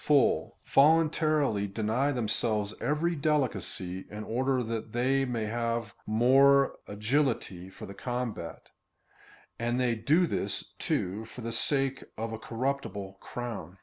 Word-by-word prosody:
full, 145 Hz, -4 st, +3 dB
voluntarily 155 Hz, -7 st, +3 dB
deny 110 Hz, +7 st, 0 dB
themselves 110 Hz, -4 st, 0 dB
every 165 Hz, +4 st, +1 dB
delicacy, 110 Hz, -, -1 dB
in 105 Hz, +1 st, -6 dB
order 130 Hz, +3 st, 0 dB
that 115 Hz, -1 st, -4 dB
they 130 Hz, +3 st, +2 dB
may 120 Hz, -4 st, -2 dB
have 115 Hz, 0 st, -2 dB
more 135 Hz, +5 st, +5 dB
agility 105 Hz, -4 st, -1 dB
for 95 Hz, -, -10 dB
the 100 Hz, -, -9 dB
combat, 120 Hz, -5 st, -4 dB, 0.9 s
and 120 Hz, +2 st, 0 dB
they 125 Hz, -2 st, +2 dB
do 145 Hz, +11 st, +3 dB
this, 100 Hz, -, -3 dB
too, 100 Hz, +5 st, -1 dB
for 125 Hz, -, -10 dB
the 115 Hz, 0 st, -4 dB
sake 135 Hz, +3 st, 0 dB
of 115 Hz, +1 st, -3 dB
a 110 Hz, -, -5 dB
corruptible 115 Hz, -6 st, -3 dB
crown. 110 Hz, -7 st, -6 dB
120 Hz, 125 wpm, -29 LUFS, 110-135 Hz, 0.9 s, more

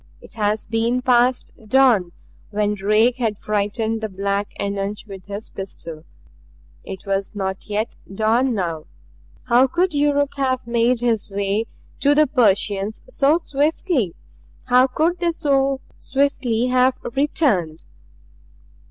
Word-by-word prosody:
It -, -, -15 dB
had 210 Hz, -1 st, +1 dB
been 235 Hz, +2 st, +1 dB
past 250 Hz, 0 st, +2 dB, 0.2 s
dawn 230 Hz, -8 st, +4 dB, 0.4 s
when 210 Hz, 0 st, 0 dB
Drake 215 Hz, +5 st, +2 dB
had 225 Hz, -5 st, -1 dB
frightened 215 Hz, +2 st, -1 dB
the 220 Hz, -, -3 dB
black 200 Hz, +1 st, -2 dB
eunuch 200 Hz, 0 st, -2 dB
with 195 Hz, -3 st, -10 dB
his 200 Hz, +2 st, -7 dB
pistol. 170 Hz, -4 st, -7 dB, 0.8 s
It 190 Hz, -, -8 dB
was 195 Hz, +1 st, -2 dB
not 190 Hz, 0 st, -4 dB
yet 210 Hz, +2 st, -2 dB
dawn 225 Hz, +5 st, +1 dB
now. 165 Hz, -5 st, -3 dB, 0.6 s
How 250 Hz, +2 st, +4 dB
could 350 Hz, +5 st, 0 dB
Yuruk 285 Hz, -1 st, +1 dB
have 260 Hz, -2 st, 0 dB
made 235 Hz, +1 st, +1 dB
his 230 Hz, -4 st, 0 dB
way 200 Hz, +2 st, -1 dB, 0.3 s
to 285 Hz, +1 st, +3 dB
the 305 Hz, +1 st, +5 dB
Persians 210 Hz, -5 st, +1 dB
so 305 Hz, -, +2 dB
swiftly 295 Hz, -, -1 dB, 0.5 s
how 250 Hz, +1 st, +4 dB
could 325 Hz, +7 st, 0 dB
they 345 Hz, -1 st, +1 dB
so 275 Hz, -4 st, +1 dB, 0.2 s
swiftly 260 Hz, -4 st, 0 dB
have 255 Hz, 0 st, +3 dB, 0.2 s
returned? 255 Hz, -, 0 dB
230 Hz, 125 wpm, -21 LUFS, 200-265 Hz, 0.8 s, the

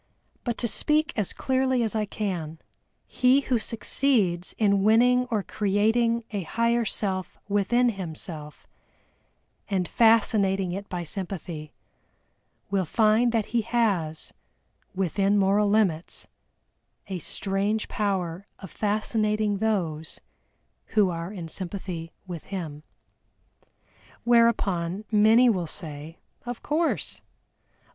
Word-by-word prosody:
But 240 Hz, -2 st, -2 dB
to 240 Hz, -, 0 dB
speak 305 Hz, +7 st, +1 dB
as 210 Hz, -4 st, -1 dB
clearly 260 Hz, -2 st, +1 dB
as 225 Hz, -1 st, -1 dB
I 215 Hz, -1 st, +1 dB
can, 175 Hz, -7 st, -4 dB, 0.5 s
he 255 Hz, +2 st, +3 dB
who 255 Hz, -3 st, 0 dB
succeeds 220 Hz, -6 st, 0 dB
in 200 Hz, -3 st, +3 dB
winning 245 Hz, +4 st, +4 dB
or 215 Hz, -4 st, 0 dB
creating 225 Hz, +4 st, +1 dB
a 205 Hz, -2 st, -2 dB
higher 230 Hz, +6 st, +1 dB
Self 190 Hz, -3 st, -2 dB
within 220 Hz, +5 st, +2 dB
himself, 160 Hz, -6 st, -7 dB, 1.0 s
and 185 Hz, -3 st, 0 dB
fascinating 205 Hz, -5 st, +3 dB
it 200 Hz, +3 st, -6 dB
by 180 Hz, -1 st, -3 dB
sympathy, 170 Hz, -3 st, -5 dB, 1.0 s
will 195 Hz, -1 st, +2 dB
find 220 Hz, +6 st, +3 dB
that 225 Hz, -1 st, -1 dB
he 235 Hz, -, +3 dB
has, 205 Hz, -9 st, -1 dB, 0.6 s
within 195 Hz, +2 st, +1 dB
moral 200 Hz, +1 st, +3 dB
limits, 190 Hz, -6 st, 0 dB, 0.8 s
a 190 Hz, -2 st, -5 dB
strange 200 Hz, +6 st, -1 dB
power 190 Hz, -3 st, -2 dB
of 190 Hz, -, -10 dB
fascinating 215 Hz, 0 st, 0 dB
those 170 Hz, -8 st, -1 dB, 0.8 s
who 200 Hz, -4 st, +5 dB
are 170 Hz, +2 st, -5 dB
in 180 Hz, -5 st, -6 dB
sympathy 175 Hz, -1 st, -5 dB
with 175 Hz, -4 st, -7 dB
him. 165 Hz, -7 st, -6 dB, 1.4 s
Whereupon 210 Hz, -6 st, +2 dB
many 220 Hz, +4 st, +6 dB
will 185 Hz, -7 st, +1 dB
say 155 Hz, -2 st, -5 dB, 0.3 s
"of 245 Hz, -1 st, -6 dB
course." 315 Hz, +2 st, 0 dB
205 Hz, 110 wpm, -26 LUFS, 180-230 Hz, 1.4 s, many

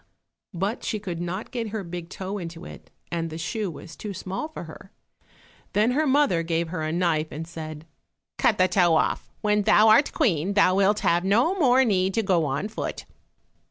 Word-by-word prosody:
But 195 Hz, +7 st, -2 dB
she 215 Hz, -, -2 dB
could 180 Hz, -5 st, -5 dB
not 180 Hz, +4 st, -4 dB
get 235 Hz, -3 st, -3 dB
her 210 Hz, -1 st, -4 dB
big 170 Hz, -1 st, -7 dB
toe 195 Hz, +2 st, -5 dB
into 170 Hz, -1 st, -8 dB
it, -, -, -12 dB, 0.2 s
and 165 Hz, -1 st, -2 dB
the 160 Hz, -, -7 dB
shoe 205 Hz, +5 st, -3 dB
was 165 Hz, 0 st, -10 dB
too 205 Hz, -2 st, -6 dB
small 195 Hz, -, -4 dB
for 315 Hz, -, -8 dB
her. -, -, -12 dB, 0.8 s
Then 210 Hz, +4 st, +3 dB
her 300 Hz, +4 st, +1 dB
mother 275 Hz, -, +3 dB
gave 165 Hz, 0 st, -1 dB
her 175 Hz, -1 st, -4 dB
a 155 Hz, 0 st, -2 dB
knife 165 Hz, -2 st, +1 dB
and 160 Hz, +1 st, -6 dB
said, 155 Hz, -2 st, -8 dB, 0.5 s
"Cut -, -, +3 dB
the 185 Hz, -, +4 dB
toe 180 Hz, -3 st, +3 dB
off; -, -, 0 dB
when 210 Hz, -1 st, +2 dB
thou 215 Hz, +1 st, +5 dB
art 250 Hz, +7 st, +5 dB
Queen 185 Hz, -, 0 dB
thou 200 Hz, -2 st, +5 dB
wilt 200 Hz, +2 st, +2 dB
have 170 Hz, +1 st, +2 dB
no 230 Hz, -, +3 dB
more 265 Hz, -8 st, +4 dB
need 190 Hz, -3 st, +1 dB
to 225 Hz, -, +1 dB
go 180 Hz, -5 st, +2 dB
on 140 Hz, +8 st, -2 dB
foot." 220 Hz, -, -5 dB
185 Hz, 195 wpm, -25 LUFS, 170-215 Hz, 0.8 s, thou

